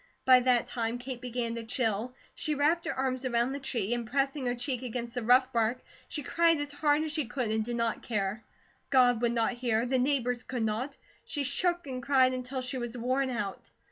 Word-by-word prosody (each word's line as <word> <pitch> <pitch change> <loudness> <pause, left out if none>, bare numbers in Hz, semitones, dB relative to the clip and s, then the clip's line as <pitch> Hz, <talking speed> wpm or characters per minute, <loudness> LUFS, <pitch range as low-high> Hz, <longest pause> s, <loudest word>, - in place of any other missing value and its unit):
By 255 -1 +8
that 250 -1 +3
time 230 0 -2
Kate 245 0 -6
began 240 -2 -2
to 230 0 -5
chill. 225 0 -1 0.2
She 305 -2 -1
wrapped 310 +4 +2
her - - 0
arms 260 -1 -1
around 240 0 +1
the 280 - -4
tree, 240 -5 -1
and 235 -2 -3
pressing 275 0 0
her 245 - 0
cheek 250 0 -2
against 240 -1 -4
the 245 - -2
rough 255 +3 +4
bark, 230 +2 +1 0.2
she 295 - -3
cried 330 +2 +3
as 290 0 -3
hard 295 +1 +2
as 315 - -3
she 310 -2 -1
could 245 -3 -2
and 220 0 +1
did 240 +2 -3
not 230 -1 0
care. 210 -1 -2 0.5
God 245 -3 +4
would 240 -1 +2
not 230 0 +1
hear; 240 -2 0
the 255 +1 +1
neighbours 250 -2 +1
could 250 -3 -3
not. 230 +6 -2 0.3
She 290 - -3
shook 345 +5 0
and 255 -2 -5
cried 260 -1 +4
until 255 +1 -4
she 255 +1 -4
was 240 0 -5
worn 260 +3 0
out. 205 -6 -4
250 Hz, 215 wpm, -30 LUFS, 235-270 Hz, 0.5 s, By